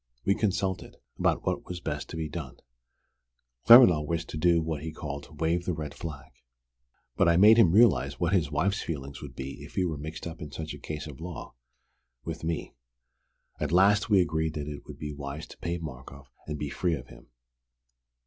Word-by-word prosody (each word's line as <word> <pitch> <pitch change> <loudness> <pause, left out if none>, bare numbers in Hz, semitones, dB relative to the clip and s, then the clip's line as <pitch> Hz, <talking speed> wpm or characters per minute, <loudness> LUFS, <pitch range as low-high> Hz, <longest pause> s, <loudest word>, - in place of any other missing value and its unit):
We 100 - +4
consulted 95 -2 -1 0.2
about - - +1
what - - -1
was 90 -1 -5
best 75 -4 -4
to - - -7
be 80 -1 -2
done. 75 -5 -7 1.1
Claremanagh 90 -11 +9
wished 85 0 -2
to - - -5
do 85 +1 +4
what 80 -2 -3
he 80 +1 -5
called 75 -1 -7
'wave 85 +2 0
the 90 - -1
red 75 -2 -5
flag.' 75 -3 -8 0.8
But - - +4
I 85 - +4
made 105 +4 +8
him 105 -8 +6
realize 75 - +4
what 85 +1 +1
his 85 -7 +2
wife's 100 +7 0
feelings 70 -3 -6
would - - -9
be 70 0 -7
if - - -12
he 95 - +2
were 80 -4 -3
mixed 80 +2 -7
up 85 -1 -7
in 75 - -6
such 80 +1 -6
a - - -9
case 75 0 -6
at 75 -1 -10
law, 85 -1 -7 0.7
with 80 0 -5
me. 80 -1 -3 0.9
At 75 -1 -2
last 100 +5 +4
we 100 -3 +6
agreed 80 -2 -1
that 75 -1 -4
it 75 -1 -8
would - - -9
be 75 -1 -5
wise 70 +1 -6
to - - -14
pay 85 0 -2
Markoff 70 -3 -9 0.2
and 75 -1 -3
be 75 -1 -4
free 85 -3 0
of 65 -3 -10
him. - - -15
80 Hz, 200 wpm, -28 LUFS, 75-85 Hz, 1.1 s, Claremanagh